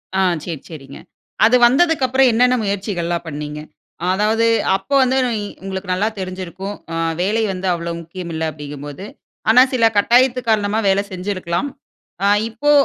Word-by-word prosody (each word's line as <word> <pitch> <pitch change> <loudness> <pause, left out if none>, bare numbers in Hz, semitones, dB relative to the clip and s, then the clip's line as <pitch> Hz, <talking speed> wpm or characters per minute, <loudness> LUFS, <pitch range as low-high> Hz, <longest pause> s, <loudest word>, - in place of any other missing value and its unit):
ஆ 190 - +2 0.2
சரி, 165 -5 -5
சரிங்க. 140 -4 -10 0.5
அது 230 +3 +5
வந்ததுக்கப்புறம், 265 -2 +3
என்னன்ன 250 +2 +4
முயற்சிகள்லாம் 190 -4 -2
பண்ணீங்க? 150 0 -5 0.5
அதாவது 215 +3 +1 0.3
அப்ப 275 - -22
வந்து, 260 +1 +1
நொய் 230 -4 -1 0.2
உங்களுக்கு 190 -1 -5
நல்லா 205 +4 0
தெரிஞ்சிருக்கும். 185 +1 -6 0.2
அ - - -2 0.3
வேலை 215 +5 +1
வந்து 185 +1 -4
அவ்ளோ 170 0 -4
முக்கியம் 170 +1 -8
இல்ல 160 - -3
அப்டிங்கும்போது 145 +3 -8 0.4
ஆனா, 240 +3 +7
சில 240 -3 +3
கட்டாயத்தின் 245 +4 +4
காரணமா, 215 -1 +1
வேல 195 +1 +3
செஞ்சிருக்கலாம். 185 +1 -3 0.6
அ - - +4 0.2
இப்போ 280 +7 0
195 Hz, 140 wpm, -19 LUFS, 170-230 Hz, 0.6 s, ஆனா